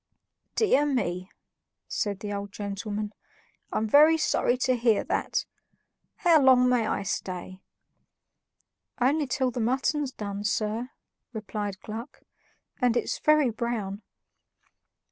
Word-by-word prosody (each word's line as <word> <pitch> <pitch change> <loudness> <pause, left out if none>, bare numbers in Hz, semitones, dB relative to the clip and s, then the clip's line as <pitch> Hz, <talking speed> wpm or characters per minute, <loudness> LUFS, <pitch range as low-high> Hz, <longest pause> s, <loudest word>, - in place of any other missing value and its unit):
"Dear 375 -10 +3
me," 185 -9 -1 0.6
said 200 -2 -2
the 205 -1 -4
old 200 0 -5
gentleman, 205 +1 -4 0.6
"I'm 220 - 0
very 305 +7 +6
sorry 250 -5 +1
to 255 0 +3
hear 230 -3 +2
that. - - -1 0.7
How 330 -3 +4
long 255 -2 +6
may 245 -3 +2
I - - -1
stay?" 185 0 -5 1.4
"Only 285 +4 +2
till 255 0 0
the 245 - -4
mutton's 265 +4 0
done, 200 -3 -5
sir," 215 +3 -1 0.4
replied 210 -3 -4
Gluck, 225 +3 -8 0.6
"and 245 -1 +3
it's - - -2
very 305 -5 +4
brown." 220 -3 -3
230 Hz, 115 wpm, -27 LUFS, 205-260 Hz, 1.4 s, very